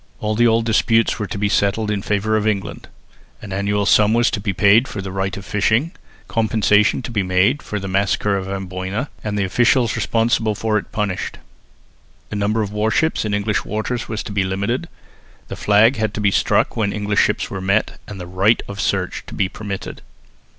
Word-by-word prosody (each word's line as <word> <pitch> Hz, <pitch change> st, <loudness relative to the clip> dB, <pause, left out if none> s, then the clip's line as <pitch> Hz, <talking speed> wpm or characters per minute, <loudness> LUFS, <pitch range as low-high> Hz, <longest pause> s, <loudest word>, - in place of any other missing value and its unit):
All 110 Hz, 0 st, -1 dB
the 120 Hz, +2 st, +3 dB
old 115 Hz, 0 st, +2 dB
disputes 115 Hz, +1 st, +2 dB
were 105 Hz, -, -2 dB
to -, -, -5 dB
be 105 Hz, +1 st, +1 dB
settled 100 Hz, +2 st, +1 dB
in 100 Hz, -2 st, -1 dB
favour 105 Hz, +2 st, 0 dB
of 110 Hz, 0 st, 0 dB
England. 100 Hz, -3 st, -3 dB, 0.5 s
An 100 Hz, -3 st, -8 dB
annual 100 Hz, +1 st, 0 dB
sum 105 Hz, +2 st, +4 dB
was 120 Hz, +1 st, +3 dB
to -, -, -2 dB
be 100 Hz, 0 st, -2 dB
paid 105 Hz, +7 st, +4 dB
for 105 Hz, -, -6 dB
the 95 Hz, -1 st, -5 dB
right 95 Hz, +1 st, -2 dB
of 100 Hz, -, -9 dB
fishing; 110 Hz, +10 st, +1 dB, 0.4 s
compensation 110 Hz, 0 st, +2 dB
to 120 Hz, -, -6 dB
be 105 Hz, -3 st, 0 dB
made 95 Hz, +9 st, +2 dB
for 105 Hz, -, -4 dB
"the 95 Hz, -, -5 dB
massacre 100 Hz, +1 st, +1 dB
of 95 Hz, -1 st, -3 dB
Amboina" 95 Hz, +5 st, -4 dB
and 105 Hz, -1 st, -2 dB
the 100 Hz, -, +1 dB
officials 120 Hz, +4 st, +2 dB
responsible 115 Hz, -1 st, +1 dB
for 110 Hz, 0 st, 0 dB
it -, -, -12 dB
punished; 105 Hz, -4 st, -3 dB, 0.9 s
the -, -, -5 dB
number 105 Hz, +2 st, 0 dB
of 100 Hz, -, -5 dB
warships 110 Hz, +8 st, +1 dB
in 105 Hz, -1 st, 0 dB
English 105 Hz, +1 st, -1 dB
waters 110 Hz, +3 st, -3 dB
was 110 Hz, -2 st, -3 dB
to -, -, -7 dB
be 100 Hz, -1 st, +1 dB
limited; 100 Hz, -, -2 dB, 0.6 s
the -, -, -5 dB
flag 105 Hz, +5 st, +4 dB
had 110 Hz, -1 st, -1 dB
to -, -, -3 dB
be 100 Hz, -1 st, +2 dB
struck -, -, +1 dB
when 105 Hz, -3 st, 0 dB
English 105 Hz, 0 st, -1 dB
ships 105 Hz, -, 0 dB
were 95 Hz, -, -4 dB
met 100 Hz, +3 st, 0 dB
and 100 Hz, -2 st, -8 dB
the 90 Hz, -, -6 dB
right 95 Hz, +5 st, +2 dB
of 100 Hz, +1 st, -5 dB
search 95 Hz, -3 st, -1 dB
to -, -, -8 dB
be 95 Hz, -, +1 dB
permitted. 100 Hz, -1 st, -7 dB
105 Hz, 205 wpm, -20 LUFS, 100-110 Hz, 0.9 s, sum